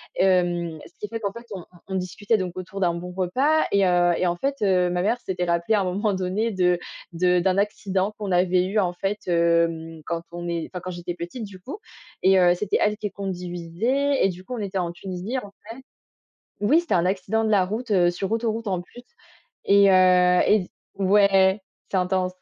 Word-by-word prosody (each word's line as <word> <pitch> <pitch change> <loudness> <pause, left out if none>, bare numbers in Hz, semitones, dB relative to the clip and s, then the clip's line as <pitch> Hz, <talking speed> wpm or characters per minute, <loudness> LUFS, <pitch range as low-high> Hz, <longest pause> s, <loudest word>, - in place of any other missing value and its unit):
Hem, 175 -3 +1
ce - - -19
qui 210 - -5
fait 225 +1 -5
qu'en 200 - -2
fait, 235 +3 -11
on 185 -3 -7 0.3
on 190 - -3
discutait 190 +4 -1
donc 185 -3 -3
autour 185 +2 -6
d'un 175 -2 +2
bon 175 +1 -6
repas 260 - +2
et 200 -1 +3
heu 175 -1 +3
et 180 - +1
en 175 - 0
fait, 275 +9 -2
heu, 180 -3 +3
ma 180 0 -1
mère 225 +6 0
s'était 180 -1 -3
rappelée 170 +5 +1
à 205 - +2
un - - 0
moment 200 +3 0
donné, 190 +5 -1
de 180 -3 +2 0.4
de 180 +1 +2
d'un 185 +1 +1
accident 200 -1 -1
qu'on 205 -3 -4
avait 180 0 +3
eu, 200 +3 0
en 180 -3 +1
fait. 195 +3 -3
Hem, 170 -1 +1
quand 170 -1 -3
on 175 0 -5
est 170 -2 -3
enfin, 180 - -5
quand 185 - -5
j'étais 175 0 -5
petite 175 +7 -6
du 195 -2 -12
coup 275 - -7 0.5
et 190 0 +5
heu, 175 -1 +5
c'était 200 +2 0
elle 210 0 +2
qui 210 -2 -4
conduisait 195 +9 -1
et - - +3
du 180 0 -8
coup, 250 +7 -6
on - - -6
était 195 -2 -3
en 175 -2 -2
Tunisie, 185 +6 -5
en 205 -6 -6
fait. 205 +1 -25 1.0
Oui, 300 +10 +5
c'était 345 - -1
un 175 0 +2
accident 195 +4 0
de 220 - 0
la 195 -3 +4
route, 220 +5 -4
heu, 180 -3 +4
sur 185 +3 -4
autoroute, 225 0 -1
en 185 -3 -1
plus 245 +7 -14 0.6
et 200 0 +6
heu 180 -1 +5
et 210 -3 +4
z - - -21 0.3
ouais, 195 0 +4 0.3
c'est 195 - +1
intense. 185 0 0
185 Hz, 215 wpm, -24 LUFS, 180-205 Hz, 1.0 s, et